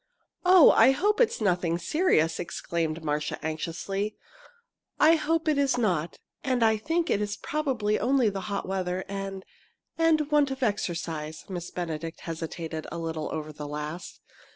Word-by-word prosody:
"Oh, 360 -3 +8
I 265 - +6
hope 420 - +1
it's 480 - +2
nothing 180 -5 +1
serious!" 170 - +1
exclaimed 165 -1 -3
Marcia, 150 -1 -1
anxiously. 180 +6 -3 0.8
"I 315 +2 +7
hope 325 +1 0
it 300 -2 +3
is 275 -3 +2
not 175 -8 0 0.3
and 255 -3 +1
I 220 -1 +4
think 325 +9 -1
it 205 - +2
is 205 0 -2
probably 255 -9 -1
only 260 -2 +3
the 195 -1 -4
hot 200 -2 -3
weather 185 -1 -2
and 195 -1 -5 0.5
and 310 -2 +3
want 295 -2 +4
of 265 0 -4
exercise." 165 -7 -2
Miss 175 -2 -5
Benedict 165 -2 -5
hesitated 165 -1 -5
a 170 - -5
little 160 -2 -3
over 155 -1 -5
the 150 0 -7
last. 150 +4 -6
195 Hz, 155 wpm, -27 LUFS, 165-270 Hz, 0.8 s, Oh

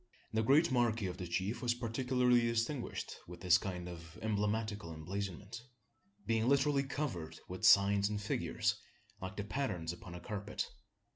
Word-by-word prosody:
The 110 - +3
great 140 +8 +5
marquee 115 -4 +2
of 90 -1 -3
the 90 - -5
chief 95 +7 -1
was 120 -1 +1
particularly 125 +1 +2
distinguished 115 +3 -1
with 85 0 -10
this 90 -2 +5
kind 90 -2 -4
of 85 0 -9
emblematical 105 -3 -1
emblazonment 100 +6 -5 0.6
being 115 +1 +2
literally 140 0 +4
covered 125 - -3
with 90 0 -7
signs 100 0 +6
and 105 -1 -2
figures, 105 - 0 0.4
like 95 +2 -5
the 105 - -1
patterns 100 -9 -2
upon 90 0 -10
a - - -6
carpet. 105 +3 -3
105 Hz, 150 wpm, -35 LUFS, 90-120 Hz, 0.6 s, signs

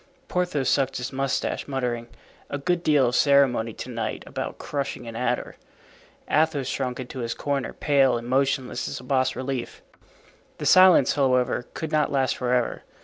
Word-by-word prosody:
Porthos 175 -7 -1
sucked 135 -2 +1
his 125 +2 -5
mustache, 135 0 -2
muttering, 125 -4 -2 0.4
"A 145 - -3
good 175 +4 0
deal 145 -6 +3
of 125 - -2
ceremony 135 -5 +3
to 125 - -8
night 115 -1 -4
about - - -5
crushing 140 -3 -4
an 115 -1 -8
adder." 125 +1 -2 0.7
Athos 155 -3 +1
shrunk 130 -2 -3
into 130 +1 -7
his 115 -1 -3
corner, 140 -4 -2
pale 135 -4 +2
and 120 0 -7
motionless 135 0 0
as - - -5
a - - -12
bas 130 0 +1
relief. 130 -1 -5 0.7
The - - -5
silence, 185 -7 +6
however, 125 -3 +1
could 160 -1 -4
not 155 -1 +1
last 135 -2 +1
forever. 125 -1 0
135 Hz, 160 wpm, -25 LUFS, 125-140 Hz, 0.7 s, silence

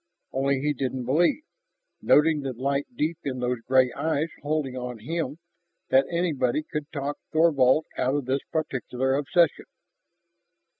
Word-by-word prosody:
Only 135 0 +1
he 150 +1 +1
didn't 130 -2 -3
believe, 170 - +2 0.6
noting 150 0 +4
the 135 -2 -3
light 140 +3 -1
deep 160 -3 -1
in 130 -2 -3
those 125 0 -1
gray 130 0 +3
eyes 160 0 -1
holding 145 -3 -1
on 125 -1 -5
him, 150 +4 -3 0.5
that 135 +1 +4
anybody 155 -5 0
could 150 0 -5
talk 145 0 -4
Thorvald 155 -3 +4
out 130 +2 +1
of 145 -3 -1
this 135 +2 0
particular 130 -4 -1
obsession. 155 +5 +2
140 Hz, 140 wpm, -26 LUFS, 130-155 Hz, 0.6 s, noting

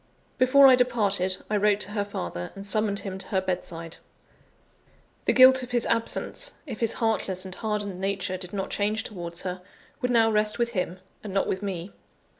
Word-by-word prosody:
Before 275 +2 +6
I 265 - +9
departed, 205 -7 +2
I 210 - 0
wrote 205 0 +3
to 205 - -2
her 205 -1 -1
father, 90 - -5
and 195 0 -8
summoned 210 -1 0
him 190 -1 -6
to - - -3
her 190 - +1
bedside. 175 -3 -4 1.3
The - - +4
guilt 260 0 +8
of 250 - -7
his 240 -2 +1
absence 230 - -2
if 245 -8 -7
his 230 -1 +1
heartless 195 -5 -1
and 185 - -6
hardened 205 -3 -3
nature 190 -1 -1
did 180 -1 -7
not 195 -2 -4
change 215 +2 0
towards 170 -4 -5
her 180 0 -4 0.4
would 250 - 0
now 225 -2 +4
rest 210 0 +1
with 235 -1 +1
him, 185 -5 -2 0.3
and 200 -3 -6
not 195 - +2
with 190 - -2
me. 190 -2 -5
205 Hz, 190 wpm, -26 LUFS, 185-230 Hz, 1.3 s, I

